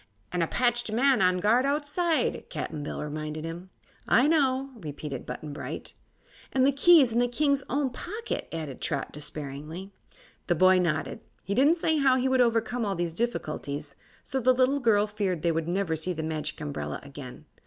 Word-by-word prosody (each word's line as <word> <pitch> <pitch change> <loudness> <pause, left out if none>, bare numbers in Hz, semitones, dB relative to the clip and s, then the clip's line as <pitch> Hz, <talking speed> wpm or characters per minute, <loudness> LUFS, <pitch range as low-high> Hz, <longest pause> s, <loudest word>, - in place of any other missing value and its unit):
"An' 180 - -1
a 165 - +1
patched 240 0 +1
man 255 +1 +3
on 185 0 +4
guard 220 +7 +3
outside," 295 +4 0
Cap'n 155 -2 -4
Bill 145 - -4
reminded 155 +1 -5
him. 170 +3 -7 0.4
"I 255 +4 +5
know," 275 -4 +2
repeated 150 - -6
Button 145 +4 -6
Bright. - - -5 0.6
"And 260 -1 +3
the 280 - +5
key's 280 -2 +6
in 230 - +1
the 245 - +3
King's 280 +2 +1
own 275 0 0
pocket," 425 - -5
added 155 -5 -5
Trot, 150 -4 -2
despairingly. 150 +5 -6 0.6
The 175 - +2
boy 185 +2 +5
nodded. 160 -4 -1 0.2
He 200 - -2
didn't 280 +9 +5
say 320 -1 +1
how 270 -2 +4
he 260 0 +1
would 260 -1 +3
overcome 235 0 +1
all 200 -2 -1
these 170 -1 -2
difficulties, 150 -9 -3 0.3
so 270 - -2
the 255 +1 +4
little 260 +3 +3
girl 215 -5 +3
feared 200 -6 -2
they 170 - +3
would 165 0 -2
never 175 -2 0
see 170 +4 0
the 160 -1 -4
Magic 155 -1 -3
Umbrella 145 -2 -4
again. 140 0 -10
200 Hz, 180 wpm, -27 LUFS, 155-260 Hz, 0.6 s, key's